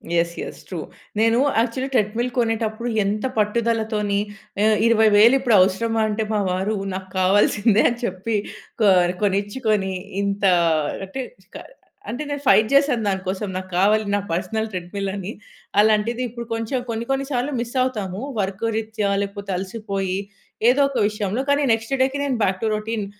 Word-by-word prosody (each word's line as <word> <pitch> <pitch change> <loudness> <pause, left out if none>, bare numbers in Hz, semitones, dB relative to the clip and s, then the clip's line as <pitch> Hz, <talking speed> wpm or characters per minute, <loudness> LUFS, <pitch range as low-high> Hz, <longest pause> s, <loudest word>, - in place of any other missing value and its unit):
Yes, 170 0 +1
yes. - - -7
True. - - -5 0.4
నేను 225 +1 +4 0.2
actual 255 +3 -1
treadmill 230 +2 +1
కొనేటప్పుడు 225 0 -1 0.2
ఎంత 210 +3 -1
పట్టుదలతోని 215 -1 0 0.4
ఆహ్, 215 0 +4
20000 220 +1 +6
ఇప్పుడు 245 -4 +3
అవసరమా 225 +4 +1
అంటే 215 +1 -1
మా 210 - +1
వారు 190 +4 -1 0.2
నాకు 190 0 -6
కావాల్సిందే 205 +3 +3
అని 240 0 -4
చెప్పి 220 +2 -3 0.5
కొ 215 - +5 0.4
కొనిచ్చుకొని 205 0 0 0.3
ఇంత 200 0 -2 0.6
అంటే 260 +7 -5 0.3
క - - -4 0.5
అంటే 255 +6 -3
నేను 285 -1 -3
ఫైట్ 215 +2 +6
చేశాను 275 -5 +3
దానికోసం 190 +1 -2
నాకు 185 0 -6
కావాలి 210 +3 +4
నా - - +1
పర్సనల్ 220 +6 -1
థ్రెడ్‌మిల్ 185 +2 -4
అని. 195 0 -5 0.5
అలాంటిది 215 +3 +3
ఇప్పుడు 235 +1 -7
కొంచెం 225 +3 -1
కొన్ని 230 0 -3
కొన్ని 270 0 0
సార్లు 260 +1 -1
మిస్ 235 0 -4
అవుతాము. 210 -7 -2 0.2
వర్క్ 190 0 -2
రిత్యా 220 -2 -2
లేకపోతే 200 0 -5
అలసిపోయి 195 -1 -3 0.5
ఏదో 265 +3 +3
ఒక 275 - -4
విషయంలో. 210 +2 -2
కానీ 285 +1 +3
నెక్స్ట్ 225 +3 0
డేకి 265 +1 +1
నేను 275 -3 0
బ్యాక్ 190 -1 0
టు - - +2
రొటీన్ 215 0 -3
215 Hz, 150 wpm, -22 LUFS, 200-235 Hz, 0.6 s, 20000